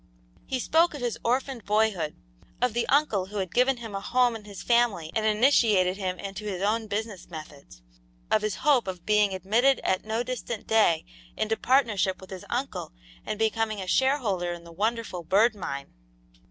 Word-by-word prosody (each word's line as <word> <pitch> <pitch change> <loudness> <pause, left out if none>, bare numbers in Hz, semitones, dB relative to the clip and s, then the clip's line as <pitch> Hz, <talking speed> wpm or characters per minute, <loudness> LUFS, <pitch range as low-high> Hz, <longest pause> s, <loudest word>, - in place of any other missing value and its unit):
He 260 - -1
spoke 325 +5 +3
of 285 - -7
his 240 -2 -2
orphaned 255 0 -1
boyhood; 205 -7 +1 0.4
of 250 -2 +1
the 240 +1 -1
uncle 245 -10 +2
who 210 +2 -7
had 190 -3 -3
given 250 +1 +3
him 225 -3 -8
a 195 - -3
home 245 +2 +2
in 215 -2 -9
his 200 -2 -9
family 235 -10 +2
and 220 -1 +1
initiated 215 -5 +4
him 185 -2 -3
into 200 +2 -7
his 195 -4 -3
own 220 +2 0
business 210 -2 -4
methods; 150 - -11 0.5
of - - +4
his 210 -3 -1
hope 275 -8 +4
of 180 -2 -6
being 210 -1 +3
admitted 225 +9 +2
at 185 - 0
no 220 +2 -1
distant 240 -3 -5
day 210 -8 +3 0.3
into 220 +1 0
partnership 220 -8 +2
with 190 - -13
his 185 -1 -8
uncle 250 - -3 0.3
and 215 - -2
becoming 220 -1 0
a 190 - -4
shareholder 210 -6 +1
in 170 -1 -9
the 170 - -12
wonderful 215 0 -2
Bird 205 +7 +3
Mine. 140 -9 -6
215 Hz, 180 wpm, -27 LUFS, 190-240 Hz, 0.5 s, initiated